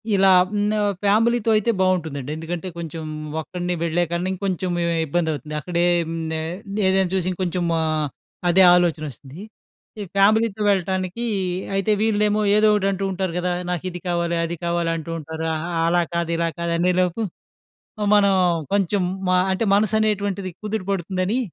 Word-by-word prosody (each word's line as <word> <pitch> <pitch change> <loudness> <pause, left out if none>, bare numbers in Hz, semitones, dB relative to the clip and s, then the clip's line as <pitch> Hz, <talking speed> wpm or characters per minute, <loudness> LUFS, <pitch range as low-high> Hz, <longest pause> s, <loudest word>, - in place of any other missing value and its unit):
ఇలా 195 0 +4 0.2
హ్మ్. 205 -1 0 0.4
ఫ్యామిలీతో 225 +3 +2
అయితే 230 +3 +1
బావుంటుందండి. 160 -7 0
ఎందుకంటే 175 +3 -5
కొంచెం 165 -1 -6 0.4
ఒక్కడినే 180 +2 -4
వెళ్ళేకన్నా 170 +2 0
ఇంకొంచెం 185 -1 -2 0.4
ఇబ్బందవుతుంది. 155 -2 -2
అక్కడేం 175 0 0 0.2
నే 160 - -1 0.5
ఏదైనా 190 0 +3
చూసి 185 -1 0
ఇంకొంచెం 180 -1 -2 0.2
ఆహ్, 155 -2 0 0.4
అదే 190 +2 +6
ఆలోచనొస్తుంది. 155 - -2 0.6
ఈ - - -3
ఫ్యామిలీతో 215 +1 +3
వెళ్ళటానికి 190 +2 -1 0.5
అయితే 195 +2 +1
వీళ్ళేమో 210 -1 +2
ఏదో 215 0 +5
ఒకటంటూంటారు 195 -2 -1
గదా! 180 0 0 0.2
నాకిది 180 0 -3
కావాలి 170 -1 0
అది 170 +1 -3
కావాలి 170 -1 0
అంటూ 165 0 -6
ఉంటారు. 160 +1 -6
ఆ! - - -1 0.3
అలా 175 +1 +3
కాదు 170 -1 -1
ఇలా 170 0 +1
కాదు 170 0 -1
అనేలోపు 180 +4 +1 0.9
మనం 200 -1 +4 0.4
కొంచెం 200 -1 +1 0.3
మ - - +2 0.2
అంటే 205 +4 0
మనసనేటువంటిది 205 -3 0
కుదుటపడుతుందని 195 0 -2
180 Hz, 125 wpm, -22 LUFS, 170-200 Hz, 0.9 s, అదే